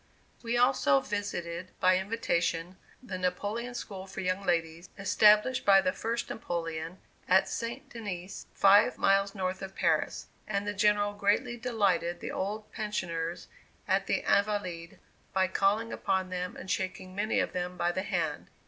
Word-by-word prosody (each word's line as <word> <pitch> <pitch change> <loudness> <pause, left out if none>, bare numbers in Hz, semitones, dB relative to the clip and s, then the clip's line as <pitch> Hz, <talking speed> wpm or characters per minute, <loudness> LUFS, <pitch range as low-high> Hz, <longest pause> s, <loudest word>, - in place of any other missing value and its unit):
We 235 0 -1
also 245 - +4
visited, 175 -2 -4
by 185 0 +4
invitation, 180 -4 -1 0.3
the 190 -7 -5
Napoleon 205 +7 -2
School 195 -5 -6
for - - -6
young 185 +1 -1
ladies, 170 -1 -1
established 210 +5 +4
by 195 -1 +7
the 185 -1 +1
First 230 +4 -2
Napoleon, 165 -4 -4 0.3
at 190 +1 +5
St. 240 +5 -4
Denis, 200 -7 -7
five 205 +4 +5
miles 195 +1 +2
north 185 -1 -2
of 195 0 -7
Paris, 165 -4 0 0.2
and 200 -1 -1
the 205 - -2
General 205 0 +2
greatly 205 +4 +1
delighted 200 -8 0
the - - -5
old 210 +2 -4
pensioners 175 -6 -3 0.4
at - - +1
the - - 0
Invalides 190 -5 0 0.4
by 190 0 +3
calling 200 +4 +1
upon 190 -1 -1
them, 180 0 -4
and 185 - -6
shaking 185 0 -3
many 210 +3 0
of - - -1
them 180 0 -3
by 175 - +1
the 185 - -2
hand. 170 -6 -2
195 Hz, 150 wpm, -30 LUFS, 180-210 Hz, 0.4 s, by